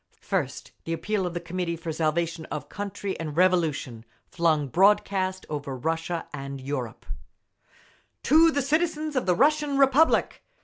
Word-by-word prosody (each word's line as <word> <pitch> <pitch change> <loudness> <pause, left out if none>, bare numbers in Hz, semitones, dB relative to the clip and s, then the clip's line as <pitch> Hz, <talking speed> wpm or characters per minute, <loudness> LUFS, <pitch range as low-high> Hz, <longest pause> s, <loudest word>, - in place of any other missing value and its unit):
First, - - -3
the 165 - -2
appeal 195 +2 -1
of 175 - -6
the - - -1
Committee 175 0 -3
for 165 0 -5
Salvation 160 +1 -1
of 150 - -6
Country 200 -1 -4
and 155 -2 -5
Revolution, 160 -10 +1 0.2
flung 160 -4 +1
broadcast 190 - +2
over 140 -3 -5
Russia 165 +4 -2
and 140 -1 -6
Europe: 130 -4 -5 1.2
TO 320 +5 +6
THE 285 -3 0
CITIZENS 310 +1 0
OF 255 - 0
THE 180 - +3
RUSSIAN 295 - +2
REPUBLIC! 275 +3 +3
175 Hz, 140 wpm, -26 LUFS, 155-215 Hz, 1.2 s, TO